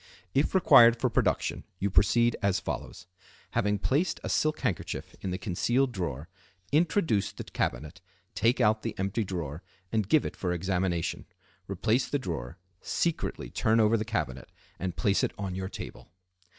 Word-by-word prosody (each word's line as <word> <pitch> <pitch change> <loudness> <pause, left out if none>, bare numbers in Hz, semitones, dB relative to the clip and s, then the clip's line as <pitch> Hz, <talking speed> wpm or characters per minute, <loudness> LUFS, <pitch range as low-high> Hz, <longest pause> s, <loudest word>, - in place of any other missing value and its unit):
If 140 +7 +1
required 120 -10 +7
for 125 0 +1
production - - 0
you 100 +1 -1
proceed 120 +5 +4
as 100 -2 +2
follows:—Having 95 +3 -4
placed 145 - 0
a - - -3
silk 155 0 +1
handkerchief - - -3
in 95 - -3
the 90 - -2
concealed 120 +8 +1
drawer, 80 - -4 0.4
introduce 155 - +2
the - - -7
cabinet, 75 +6 -3 0.3
take 115 +4 +2
out 110 -2 +3
the 115 - -4
empty 100 +4 -1
drawer, 85 -5 -5 0.3
and 110 -3 0
give 155 - +4
it - - -4
for 90 -2 -2
examination. 90 -1 -1 0.4
Replace 110 +6 +1
the 145 - +1
drawer, 80 - -5 0.2
secretly 170 -2 -2
turn 110 +1 +2
over 110 +1 +4
the 110 - 0
cabinet, 80 - -3 0.3
and 90 -1 -3
place 100 -1 +2
it - - 0
on 95 -2 -4
your 95 0 -4
table. - - -9
100 Hz, 155 wpm, -29 LUFS, 90-120 Hz, 0.4 s, required